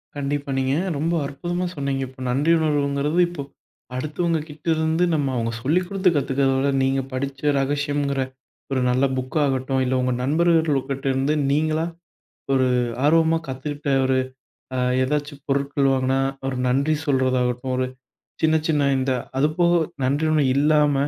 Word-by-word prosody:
கண்டிப்பா, 145 0 -3
நீங்க 130 +1 +1 0.2
ரொம்ப 160 +4 0
அற்புதமா 175 +6 -3
சொன்னீங்க. 140 -2 -2
இப்ப 130 +1 -16
நன்றி 145 +6 +2
உணர்வுங்கிறது, 145 +1 0
இப்ப 175 -4 -6 0.5
அடுத்தவங்ககிட்ட 155 +2 -3
இருந்து 160 +2 +1
நம்ம 145 -3 0
அவங்க 115 -1 -1
சொல்லிக்குடுத்து 180 +5 +2
கத்துக்கிறத 135 -1 +1
விட, 135 +1 +1
நீங்கப் 135 0 0
படிச்ச 135 +1 -4 0.2
ரகசியங்கிற 145 0 0 0.5
ஒரு 130 -1 +1
நல்ல 125 +2 +2
புக்காகட்டும். 130 0 0
இல்ல, 125 - 0
உங்க 125 0 0
நண்பர்கள் 160 0 +2
கிட்ட 135 0 -4
இருந்து 135 +3 +1 0.2
நீங்களா 155 +2 +1 0.7
ஒரு 130 -1 +3 0.4
ஆர்வமா 165 +2 +4
கத்துக்கிட்ட 145 +2 -5 0.2
ஒரு, 130 0 +2 0.6
அ, - - -1 0.3
எதாச்சு 145 +2 -2
பொருட்கள் 140 0 +1
வாங்குனா 130 0 +1 0.3
ஒரு 130 - -3
நன்றி 140 +5 +2
சொல்றதாகட்டும். 130 -2 +1
ஒரு 130 0 0 0.6
சின்ன 160 0 +4
சின்ன 145 -3 +2
இந்த 130 0 0 0.3
அது 150 +3 +3
போக, 175 0 +4 0.3
நன்றி 145 +5 +1
ஒண்ணும் 150 -4 +3
இல்லாம 150 0 +3
140 Hz, 135 wpm, -23 LUFS, 135-155 Hz, 0.7 s, ஆர்வமா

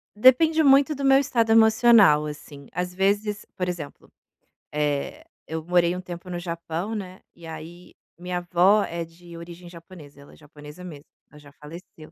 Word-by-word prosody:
Depende 315 +8 +4
muito 280 +2 +4
do 275 0 -4
meu 270 0 +6
estado 235 -5 0
emocional, 220 -8 +5
assim. 145 -2 -10
Às 180 +1 -4
vezes, 205 +2 -1
por 180 -1 -3
exemplo, 155 -5 -8 0.6
eh, 150 - -2 0.2
eu 160 0 -5
morei 175 0 +1
um 180 - -6
tempo 175 0 -9
no 175 -1 -4
Japão, 170 +4 -5
né, 185 -2 -7 0.2
e 170 - -14
aí 160 +2 -11 0.2
minha 180 0 -5
avó 180 +4 +3
é 170 0 -5
de 170 +1 -14
origem 170 +1 -11
japonesa, 165 -5 -14
ela 140 - -17
é - - -16
japonesa 150 +3 -14
mesmo, 150 -5 -10 0.2
ela 150 - -16
já 145 -1 -17
faleceu. 155 +1 -13
175 Hz, 170 wpm, -24 LUFS, 160-210 Hz, 0.6 s, meu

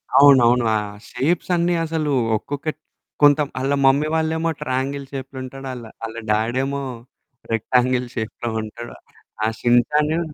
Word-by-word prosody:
అవునవును. 125 -4 +6
ఆ - - +2 0.3
షేప్స్ 165 +6 0
అన్నీ 175 +1 +1
అసలు 155 -2 -1 0.3
ఒక్కొక్కటి 145 +6 -5 0.4
కొంత 145 0 +6 0.2
ఆళ్ళ 135 +2 0
మమ్మీ 140 +3 +4
వాళ్ళు 160 0 +1
ఏమో 165 +1 0
ట్రయాంగిల్ 135 +2 -2
షేప్‌లో 135 0 -6
ఉంటాడు. 135 +1 -8 0.4
ఆళ్ళ 110 +1 -7
డ్యాడేమో 130 +6 0 0.7
రెక్టాంగిల్ 125 +2 +1
షేప్‌లో 115 0 -4
ఉంటాడు. 115 +2 -8 0.5
ఆ - - +3
షిన్ 120 0 +5
షాను 150 +2 +1
135 Hz, 130 wpm, -21 LUFS, 120-150 Hz, 0.7 s, అవునవును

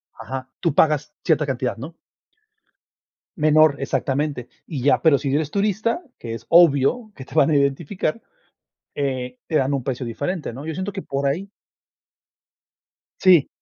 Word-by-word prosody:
Ajá. 130 0 -6
Tú - - 0
pagas 150 -1 +2
cierta 155 -3 +2
cantidad, 125 -2 -2
¿no? 150 +8 -8 1.4
Menor, 155 -1 +5
exactamente. 135 -2 -2 0.2
Y 145 -6 -4
ya, 145 - +3
pero, 160 -4 +5
si 140 0 -3
no 135 - +1
eres 150 0 -1
turista, 215 - 0 0.2
que 115 -1 -6
es 115 0 -8
obvio 170 - +4
que 130 - -9
te 135 - -15
van 155 -2 +5
a - - +3
identificar, 150 +7 0 0.7
eh, 130 -3 -3
te 160 - -3
dan 135 -1 +2
un 135 -2 -1
precio 130 0 -3
diferente, 145 +9 -3
¿no? 135 +5 -8
Yo 160 - -3
siento 185 +4 -4
que 195 -1 -5
por 140 0 -2
ahí 180 +8 -2 1.7
Sí. 180 -6 +6
145 Hz, 160 wpm, -22 LUFS, 135-165 Hz, 1.7 s, Sí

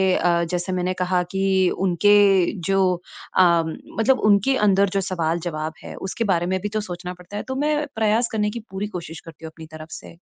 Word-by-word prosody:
अ, 170 -1 +2
जैसे 180 +1 -2
मैंने 180 0 -1
कहा 180 0 +1
कि 195 - -2 0.4
उनके 195 0 +4 0.2
जो 195 0 +2 0.6
अ, - - +7 0.3
मतलब 225 +10 -1
उनके 205 +7 +4
अंदर 200 -1 +3
जो 195 +1 -1
सवाल-जवाब 165 -3 -2
हैं - - -8
उसके 190 +4 -4
बारे 170 0 0
में 190 +1 0
भी 210 - -3
तो 215 +1 -2
सोचना 180 -2 -6
पड़ता 180 +3 -10
है। - - -4
तो 260 - -3
मैं 295 +2 0
प्रयास 220 +2 +2
करने 210 -1 0
की 235 - -5
पूरी 195 +2 -3
कोशिश 165 -2 -8
करती 165 -1 -11
हूँ 160 - -7
अपनी 160 - -10
तरफ 155 0 -10
से। 170 - -10
190 Hz, 200 wpm, -22 LUFS, 175-210 Hz, 0.6 s, अ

